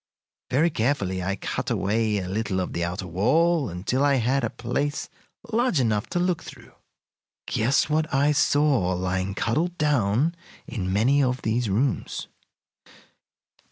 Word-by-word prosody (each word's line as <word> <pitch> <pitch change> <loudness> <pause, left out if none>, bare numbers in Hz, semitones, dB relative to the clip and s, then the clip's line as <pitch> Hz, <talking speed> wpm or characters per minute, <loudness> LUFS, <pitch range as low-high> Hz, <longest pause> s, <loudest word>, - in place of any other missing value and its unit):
Very 150 +7 +2
carefully 105 -8 0
I 95 +2 -1
cut - - -4
away 110 +1 +1
a 95 -2 -3
little 100 -1 -1
of 90 - -3
the 85 - -1
outer 90 +2 -3
wall 140 - +2
until 95 +10 -1
I 140 -1 +4
had 130 +2 +1
a 120 - 0
place 140 +6 -3 0.4
large 235 - +2
enough 110 -4 +1
to 175 - -1
look 180 -1 0
through. - - -12 0.7
Guess 125 +6 +1
what 155 +1 0
I 140 +2 +3
saw 145 -9 +2
lying 95 +1 -2
cuddled 165 +12 -1
down 145 0 +2 0.3
in 95 -5 -3
many 125 +9 +3
of 125 -1 0
these 115 +1 0
rooms? 120 +8 -1
120 Hz, 145 wpm, -25 LUFS, 100-145 Hz, 0.7 s, I